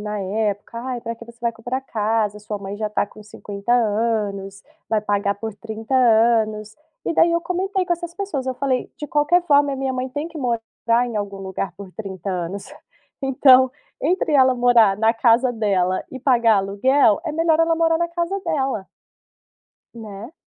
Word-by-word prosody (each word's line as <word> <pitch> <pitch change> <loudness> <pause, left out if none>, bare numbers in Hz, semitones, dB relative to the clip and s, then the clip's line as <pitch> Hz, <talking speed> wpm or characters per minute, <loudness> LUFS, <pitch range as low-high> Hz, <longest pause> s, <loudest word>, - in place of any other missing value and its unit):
na 210 0 -4
época: 205 +3 -2
"Ai, 250 -1 -4
para 230 0 -5
que 230 - -12
você 235 0 -15
vai 235 -1 0
comprar 245 +4 -4
casa, 215 -3 -1
sua 210 0 -6
mãe 200 +1 -6
já 215 0 -2
tá 210 - 0
com 215 - -15
50 205 0 -7
anos, 210 -4 0 0.3
vai 220 -1 +1
pagar 205 -1 0
por 220 +1 -6
30 220 +3 -6
anos. 220 -3 +3 0.3
E - - -1
daí 335 +1 +4
eu 335 - +1
comentei 370 +2 -1
com 350 - 0
essas 345 0 -5
pessoas 345 -10 -4
eu 260 - -1
falei: 255 -1 -1
"De 295 - -6
qualquer 295 +5 +2
forma, 285 -3 +3
a - - -3
minha 265 0 -2
mãe 255 0 -3
tem 290 +5 -4
que 325 - -9
morar 235 -1 0
em 235 - -5
algum 200 -1 -4
lugar 190 0 -4
por 195 -2 -10
30 195 -2 -6
anos. 185 +2 -5 0.5
Então 260 -1 +5 0.3
entre 345 +1 +1
ela 260 -1 +5
morar 240 -5 +4
na 225 +2 +3
casa 235 +2 +3
dela 190 -5 0
e 260 - -8
pagar 235 -5 +4
aluguel 205 +6 +3
é 315 - -3
melhor 325 0 +2
ela 330 0 +3
morar 330 0 +2
na 340 0 0
casa 345 +3 -2
dela 265 -9 -1 1.1
né. 220 +4 -9
230 Hz, 185 wpm, -21 LUFS, 210-270 Hz, 1.1 s, Então